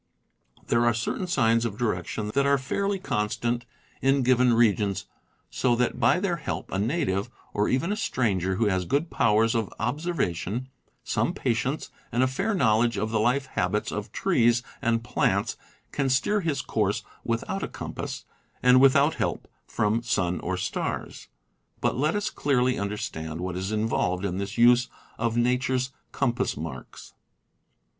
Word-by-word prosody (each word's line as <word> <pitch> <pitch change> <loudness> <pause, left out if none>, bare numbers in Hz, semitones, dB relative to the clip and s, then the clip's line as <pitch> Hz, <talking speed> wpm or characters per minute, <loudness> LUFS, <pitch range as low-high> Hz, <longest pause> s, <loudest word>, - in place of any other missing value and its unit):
There 115 0 +2
are 120 -1 +3
certain 115 +10 -2
signs 115 -8 +3
of 110 -3 -3
direction 105 -1 -2
that 140 0 +2
are 140 0 +4
fairly 195 +9 -1
constant 120 - -2 0.3
in 135 0 +3
given 125 -1 +4
regions, 105 -4 +2 0.5
so 120 -2 +2
that 125 +1 0
by 120 +9 +4
their 180 -3 0
help 150 - -5
a 95 - -1
native, 105 - 0 0.2
or 105 +1 +1
even 135 +9 +1
a - - +1
stran 120 - 0
ger 95 +2 -1
who 115 - +1
has 95 -3 +1
good 145 - 0
powers 110 +1 +3
of 115 -4 -1
observation, 125 - -2 0.3
some - - 0
patience, 125 +4 -1 0.2
and 120 +1 +2
a - - +4
fair 195 +12 -1
knowledge 115 - +3
of 110 +3 -1
the 110 - +1
life 125 +5 +2
habits - - -1
of - - -5
trees 120 0 +2 0.2
and 115 -3 +1
plants, - - 0 0.4
can 135 -1 0
steer 135 +11 +2
his 145 -5 -1
course 105 -2 0 0.2
without 115 +12 -2
a - - -2
compass, - - -6 0.4
and 125 0 +7
without 140 +3 +5
help - - -2 0.2
from 105 +2 +1
sun 95 -7 0
or 95 +1 -2
stars. 90 - -4 0.5
But - - 0
let 150 +7 +1
us 205 +1 -1
clearly 130 -3 +1
understand 80 -6 -4
what 90 0 -3
is 95 +3 -3
involved 105 -4 0
in 95 -1 -2
this 100 +2 -4
use 120 +1 +5 0.3
of 115 0 0
nature's 125 +2 +1 0.2
compass 125 -2 0
marks. 75 -3 -8
120 Hz, 160 wpm, -26 LUFS, 105-135 Hz, 0.5 s, and